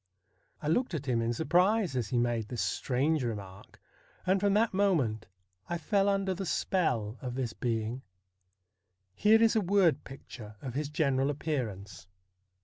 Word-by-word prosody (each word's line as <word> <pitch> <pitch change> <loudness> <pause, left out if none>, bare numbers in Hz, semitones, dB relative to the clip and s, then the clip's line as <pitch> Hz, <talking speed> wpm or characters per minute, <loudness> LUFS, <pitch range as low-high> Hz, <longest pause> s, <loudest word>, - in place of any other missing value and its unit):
I - - -2
looked 190 +4 +1
at 145 -2 -4
him 120 -3 +1
in 115 +1 0
surprise 180 - +2
as 120 -4 -1
he 120 - -1
made 120 -2 0
this 120 +1 -3
strange 140 +3 0
remark, 100 -5 -7 0.5
and 190 +1 +3
from 200 0 +2
that 225 0 +2
moment 155 - +1 0.4
I 175 - -1
fell 200 +4 +1
under 195 -1 +1
the 190 +2 -5
spell 125 - -1
of 125 -2 -5
this 125 -4 -2
being. 115 +1 -2 1.1
Here 215 - +5
is 225 0 +4
a 220 - +3
word 180 -6 +3
picture 115 -5 -11
of 130 0 -6
his 145 +2 -2
general 140 -3 +1
appearance. 110 - -4
140 Hz, 155 wpm, -30 LUFS, 120-190 Hz, 1.1 s, Here